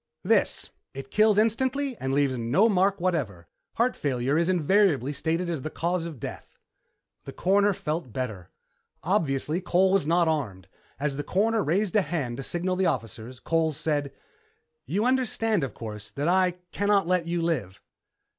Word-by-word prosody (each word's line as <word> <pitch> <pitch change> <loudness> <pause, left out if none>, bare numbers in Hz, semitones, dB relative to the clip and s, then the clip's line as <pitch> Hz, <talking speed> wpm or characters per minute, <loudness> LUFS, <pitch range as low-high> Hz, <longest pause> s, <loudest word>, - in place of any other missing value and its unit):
"This. - - +1 0.2
It 135 0 -8
kills 215 -1 +4
instantly 260 +5 +1
and 130 - -3
leaves 140 -1 +2
no 125 - +3
mark 195 -1 +2
whatever. 135 - -2 0.3
Heart 245 +2 +1
failure 135 0 -1
is 170 +2 +2
invariably 175 - +2
stated 165 +5 -1
as 165 -5 -2
the 155 - -4
cause 170 +1 -2
of 155 -7 -9
death." - - -8 0.7
The - - -7
Coroner 200 +2 +3
felt 160 - -4
better. 105 -8 -5 0.5
Obviously, 160 -3 0
Cole 185 +1 +2
was 195 -6 +2
not 170 +1 +3
armed. 110 - -2 0.3
As 140 -1 -1
the 145 - -2
Coroner 220 +6 +1
raised 185 +5 0
a 210 - +5
hand 140 -10 -3
to - - -4
signal 180 +5 -2
the 190 -1 +2
officers, 115 - -4
Cole 160 +2 0
said, 145 -1 -2 0.8
"You 205 +4 0
understand, 225 - +1
of 130 -6 -4
course, 105 -2 -8
that 145 +3 -3
I 185 0 +3 0.2
can't 200 -2 +2
let 180 -1 0
you 170 0 -1
live." 120 - -2
165 Hz, 165 wpm, -26 LUFS, 135-195 Hz, 0.8 s, a